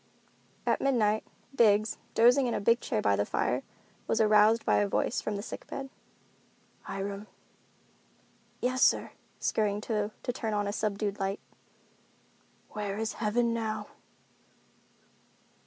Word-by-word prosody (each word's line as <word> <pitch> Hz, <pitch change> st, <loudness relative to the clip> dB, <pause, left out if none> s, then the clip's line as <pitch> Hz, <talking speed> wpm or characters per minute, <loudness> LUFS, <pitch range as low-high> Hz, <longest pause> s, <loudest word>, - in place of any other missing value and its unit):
At -, -, +1 dB
midnight, 220 Hz, -6 st, +2 dB, 0.3 s
Biggs, 215 Hz, -3 st, +3 dB, 0.2 s
dozing 245 Hz, +3 st, +5 dB
in 235 Hz, -, -1 dB
a -, -, 0 dB
big 230 Hz, +4 st, +3 dB
chair -, -, -1 dB
by 100 Hz, -1 st, +3 dB
the 100 Hz, -, +1 dB
fire, -, -, 0 dB, 0.5 s
was 225 Hz, -, +1 dB
aroused 215 Hz, +1 st, +5 dB
by -, -, +3 dB
a 205 Hz, -, +2 dB
voice 200 Hz, -, 0 dB
from 215 Hz, -, -3 dB
the 200 Hz, -, -4 dB
sick -, -, -8 dB
bed. 270 Hz, -1 st, -6 dB, 0.9 s
"Hiram." 195 Hz, +1 st, -5 dB, 1.3 s
"Yes, 255 Hz, +1 st, 0 dB
sir," -, -, +3 dB, 0.3 s
scurrying 205 Hz, -2 st, 0 dB
to 210 Hz, -2 st, -1 dB
turn 230 Hz, -3 st, -2 dB
on 205 Hz, 0 st, 0 dB
a 200 Hz, -, -2 dB
subdued 205 Hz, -1 st, -2 dB
light. 195 Hz, +1 st, -1 dB, 1.3 s
"Where 205 Hz, -1 st, -4 dB
is 225 Hz, +1 st, -2 dB
heaven 230 Hz, +2 st, +1 dB
now?" 220 Hz, -2 st, -3 dB
215 Hz, 130 wpm, -29 LUFS, 205-230 Hz, 1.3 s, dozing